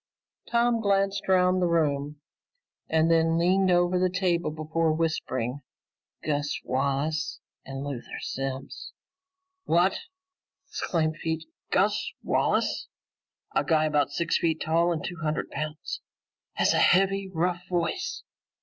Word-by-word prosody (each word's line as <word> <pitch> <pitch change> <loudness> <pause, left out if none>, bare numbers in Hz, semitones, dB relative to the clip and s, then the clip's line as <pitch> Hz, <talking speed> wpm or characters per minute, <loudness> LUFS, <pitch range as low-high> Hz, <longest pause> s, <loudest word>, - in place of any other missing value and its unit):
Tom 235 -1 +2
glanced 195 -1 +1
around 185 0 +4
the 180 - +2
room 150 -3 0 0.7
and 160 +1 +3
then 165 0 +3
leaned 185 +3 +3
over 175 0 +3
the 185 0 +3
table 180 -2 0
before 155 +1 0
whispering, 145 -5 -2 0.6
"Gus 145 -1 -1
Wallace 140 +4 -1 0.3
and 135 0 -5
Luther 140 -4 -6
Simms." 135 0 -5 0.7
"What?" 175 +3 +3 0.7
exclaimed 155 -2 -1
Pete. 160 0 -2 0.2
"Gus - - +1
Wallace? - - +1 0.7
A - - +2
guy 155 -2 +3
about 150 -2 +2
six 170 +4 0
feet 160 -1 0
tall 170 +2 +3
and 160 -3 -2
two 175 - -5
hundred 155 -2 -2
pounds? 155 +1 -4 0.5
Has - - +2
a - - +2
heavy 195 +1 +4
rough 180 +1 -1
voice?" 185 - -2
165 Hz, 120 wpm, -27 LUFS, 150-180 Hz, 0.7 s, around